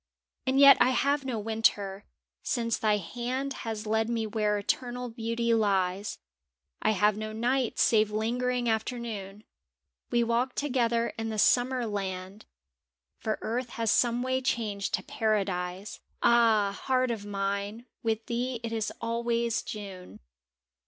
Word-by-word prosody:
And 265 +1 +3
yet 280 0 +9
I 245 - +5
have 280 +2 +1
no 255 -4 -2
Winter, 205 -2 0 0.4
since 230 -2 0
thy 215 -1 +3
hand 250 +8 -3 0.2
Has 220 -1 -4
led 220 +1 +1
me 230 -2 0
where 210 -1 0
eternal 245 +4 -2
beauty 230 0 -1
lies, 200 -2 +1 0.6
I - - +2
have 210 0 +3
no 215 0 -4
night 245 +2 0
save 215 -2 +4
lingering 240 +3 -1
afternoon; 220 -3 -3 0.7
We 240 0 +2
walk 235 +2 0
together 235 -4 +1
in 225 0 -2
the 220 - -3
Summer 245 +3 +3
land, 195 -1 -5 0.7
For 220 - -2
earth 245 +2 -2
has 230 -2 +1
someway 250 +2 +2
changed 215 -6 -1
to - - -7
Paradise 195 -2 -2 0.2
— - - -13
Ah, 225 -4 +4
Heart 255 -1 +2
of 220 -3 -4
Mine, 200 +2 -3 0.2
with 225 -1 -1
thee 245 +1 -2
't 230 0 -3
is 220 -1 -1
always 235 0 0
June! 195 -4 -8
225 Hz, 140 wpm, -28 LUFS, 210-240 Hz, 0.7 s, yet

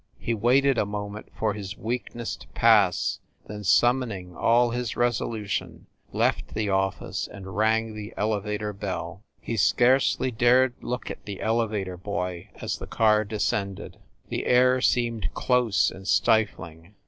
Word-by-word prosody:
He 115 - -2
waited 125 +4 +3
a - - +2
moment 105 +1 -6
for 110 -2 0
his 100 -1 -7
weakness 120 0 -4
to - - -15
pass, 105 -6 +3 0.3
then 105 0 -8
summoning 110 -5 +2
all 120 +4 +3
his 120 -1 -3
resolution, 115 -3 -2 0.3
left - - 0
the 105 -2 -1
office 95 0 -1
and 95 -2 -10
rang 110 +1 +1
the 105 0 -7
elevator 105 0 -2
bell. 95 -3 -5 0.2
He 115 - -4
scarcely 130 +4 +3
dared 125 +2 +4
look 125 +1 -4
at - - -9
the 100 -2 -6
elevator 110 -5 -1
boy 90 -2 -4
as - - -4
the - - -7
car 110 -1 +3
descended. 100 -2 -3 0.3
The - - -3
air 125 +1 +4
seemed 115 -8 +1
close 125 -5 +2
and 95 +1 -11
stifling. 100 -7 0
110 Hz, 140 wpm, -26 LUFS, 100-120 Hz, 0.3 s, dared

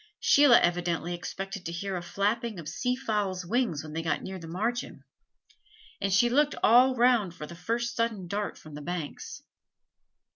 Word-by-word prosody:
Sheila 280 -4 +6
evidently 175 0 0
expected 195 +2 -6
to - - -4
hear 190 +3 -4
a 180 - -3
flapping 210 +5 -1
of 160 - -8
sea 250 +8 -1
fowls' 205 -7 -2
wings 215 - 0
when 155 -1 -9
they 165 - -2
got 160 -3 -1
near 190 0 -6
the 165 - -9
margin; 225 +8 -3 1.0
and 195 0 +3
looked 285 +5 +2
all 255 +3 +6
round 235 -7 +3
for 150 - -7
the 170 - -10
first 235 +7 -2
sudden 225 -6 -1
dart 205 +3 -3
from 155 - -13
the 150 - -7
banks. 165 -1 -6
195 Hz, 170 wpm, -28 LUFS, 175-235 Hz, 1.0 s, Sheila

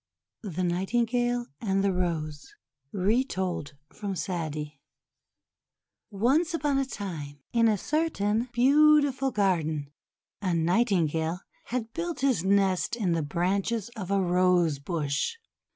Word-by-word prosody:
THE 185 -4 -3
NIGHTINGALE 240 +7 0 0.2
AND 195 -2 +1
THE 200 -1 +2
ROSE 160 -4 -3 0.4
Retold 190 - -1 0.2
from 200 -2 -4
Sa'di 155 -5 -4 1.3
ONCE 275 - +1
upon 285 -3 +1
a 275 - +1
time, 160 - -6 0.2
in 230 -1 +4
a 215 -2 +3
certain 245 - 0
beautiful 280 +1 +4
garden, 160 - 0 0.5
a 185 -4 0
Nightingale 170 -2 +1 0.2
had 230 -2 -4
built 340 -3 -3
his 260 -10 +2
nest 195 +2 +2
in 205 -7 0
the 165 -1 +1
branches 190 +8 -1
of 195 -5 -6
a 200 0 +2
Rose 180 -4 +2
Bush. 150 - -2
195 Hz, 115 wpm, -27 LUFS, 170-240 Hz, 1.3 s, in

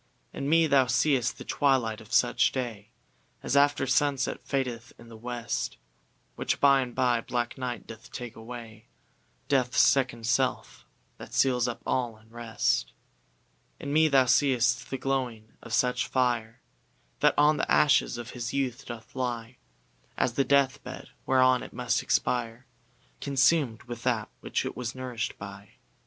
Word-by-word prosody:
In 140 - -3
me 165 +1 +5
thou 140 -4 +4
seeŌĆÖst 125 0 +1
the - - -10
twilight 125 -6 +1
of 110 - -16
such - - +3
day 115 -5 -5 0.5
As - - -1
after 145 -1 +4
sunset 135 0 +1
fadeth 125 -4 -3
in 120 - -15
the 115 - -11
west; 120 +1 -4 0.6
Which - - -1
by 140 -1 +5
and 125 -2 -5
by 125 -2 +2
black 120 0 -2
night 125 -2 -5
doth 110 0 -12
take 120 -2 -7
away, 115 -1 -10 0.6
DeathŌĆÖs 130 -3 +1
second 125 -4 +3
self, 125 +3 -1 0.3
that - - -9
seals 125 -2 +3
up 120 - -5
all 120 -4 -1
in 110 +1 -23
rest. 115 -1 -1 0.9
In 140 - -4
me 160 +1 +5
thou 135 -3 +4
seeŌĆÖst 125 -2 +2
the 135 - -3
glowing 125 -5 -3
of - - -11
such 125 +3 +1
fire, 120 -3 -1 0.6
That - - +4
on 150 +1 +5
the - - -2
ashes 145 -4 +4
of 120 0 -7
his 120 0 -5
youth 135 -1 -2
doth 115 -1 -9
lie, 120 -1 -3 0.6
As 120 - +1
the 135 - +2
death 140 0 +2
bed, - - -9 0.2
whereon 130 -1 +4
it - - -9
must 125 0 0
expire, 120 0 -1 0.6
ConsumŌĆÖd 135 -3 +2
with 120 -1 -8
that 115 -4 0
which - - -2
it - - -4
was 120 0 -4
nourishŌĆÖd 125 -4 -4
by. 100 0 -10
125 Hz, 155 wpm, -28 LUFS, 115-135 Hz, 0.9 s, me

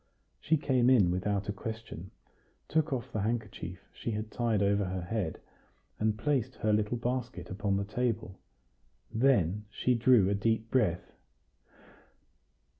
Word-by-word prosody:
She 160 +1 +2
came 130 -4 +2
in 105 -9 +5
without 100 +2 -1
a 105 - -1
question, 110 -3 -7 0.6
took 160 0 +1
off 130 -1 -3
the 110 - -1
handkerchief 105 -5 -4
she - - -5
had 110 0 -3
tied 115 -4 +1
over 100 0 +2
her 90 -1 -3
head, 95 -3 -2 0.6
and 110 0 +1
placed 130 -1 0
her 105 0 +1
little 105 +3 +1
basket 125 -2 -3
upon 100 0 0
the 100 - -1
table; 110 -3 -2 0.7
then 105 -5 +2
she 125 +4 +1
drew 120 -4 +5
a 100 - +2
deep 110 +2 0
breath. 105 -10 +1
110 Hz, 140 wpm, -31 LUFS, 100-120 Hz, 0.7 s, in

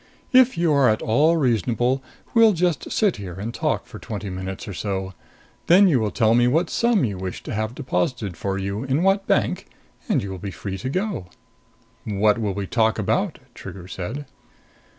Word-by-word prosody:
If 255 -5 +6
you 165 -2 +2
are 140 -4 +5
at 110 - 0
all 150 +9 +3
reasonable, 120 - +1 0.3
we'll 225 -2 +6
just 175 -2 -1
sit 205 - +2
here 95 -4 -7
and 105 +5 -5
talk - - -1
for - - -11
twenty 105 -2 -6
minutes 95 +4 -6
or 100 - -5
so. 95 0 -3 0.5
Then 190 +4 +7
you 145 -8 +3
will 110 -2 0
tell 110 0 +2
me 120 +1 +4
what 160 +7 +1
sum 235 - +2
you 100 -5 -4
wish 95 -1 -5
to - - -6
have 110 +2 -2
deposited 105 - -2
for 95 +2 -3
you 100 +3 -3
in 135 +5 0
what 195 +1 +2
bank, - - +1 0.4
and - - +2
you 100 - -5
will 95 - -6
be 100 - -5
free 95 0 -6
to 130 - -3
go." 185 - -2 0.8
"What 105 +1 +2
will 100 -3 -1
we 100 -1 -3
talk 110 +1 +1
about?" - - 0 0.2
Trigger 90 -2 -9
said. 110 +11 -5
115 Hz, 190 wpm, -23 LUFS, 100-155 Hz, 0.8 s, Then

